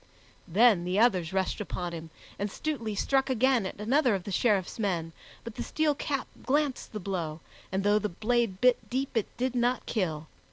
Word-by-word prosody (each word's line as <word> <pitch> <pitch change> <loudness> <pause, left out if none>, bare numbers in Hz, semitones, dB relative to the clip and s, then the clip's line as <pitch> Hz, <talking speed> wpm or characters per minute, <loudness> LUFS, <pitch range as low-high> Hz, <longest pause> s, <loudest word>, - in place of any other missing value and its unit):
Then 200 0 +5
the 180 +2 -1
others 190 -7 +3
rushed 190 +2 -1
upon 180 -3 -4
him, 165 -1 -7 0.3
and 205 +1 -1
Stutely 230 -4 -3
struck 270 +5 +1
again 255 -4 +3
at - - -9
another 245 +2 +3
of 190 - -4
the 200 - -6
Sheriff's 200 -1 +1
men, 170 -6 -1 0.3
but 230 - -7
the - - -6
steel 310 -1 +1
cap 280 -1 -2 0.2
glanced 285 -1 0
the 215 - -3
blow, 175 -5 -3 0.3
and 190 +1 0
though 205 +1 +4
the 210 0 -2
blade 220 +1 0
bit 250 -1 +3
deep, 265 +1 -2
it 225 - +1
did 255 +1 0
not 245 +1 +1
kill. 165 -8 -1
215 Hz, 190 wpm, -29 LUFS, 185-250 Hz, 0.3 s, Then